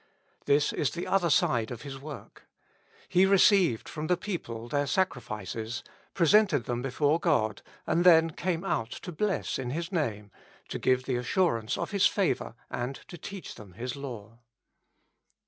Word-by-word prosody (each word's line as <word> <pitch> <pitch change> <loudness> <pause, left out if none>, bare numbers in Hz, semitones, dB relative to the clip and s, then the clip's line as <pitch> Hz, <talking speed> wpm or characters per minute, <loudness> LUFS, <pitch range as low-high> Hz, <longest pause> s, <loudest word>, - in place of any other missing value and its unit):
This 145 +1 +3
is 145 - +1
the 170 - -5
other 185 -3 +2
side 120 -6 +2
of 120 +1 -7
his 135 -2 -7
work. 145 +1 -10 0.6
He 180 - +4
received 190 - +4
from 155 0 -5
the 180 - +2
people 120 - -5
their 145 +3 0
sacrifices, 115 - -2 0.3
presented 185 - +4
them 120 +1 -3
before 145 +5 +1
God, 110 - +1 0.2
and 170 - +2
then 165 -2 +6
came 170 +1 -2
out 120 -11 -1
to 180 - -7
bless 195 -1 -1
in 125 -2 -3
His 165 +6 -3
Name, 105 - -2 0.4
to - - -4
give 130 0 +2
the 130 -2 -1
assurance 125 - 0
of - - -3
His 200 -2 +4
favor 175 - -1 0.2
and 125 +3 -3
to - - -8
teach 195 +2 -7
them 100 -4 -13
His 120 +6 -5
law. 115 -5 -8
145 Hz, 160 wpm, -29 LUFS, 120-175 Hz, 0.6 s, then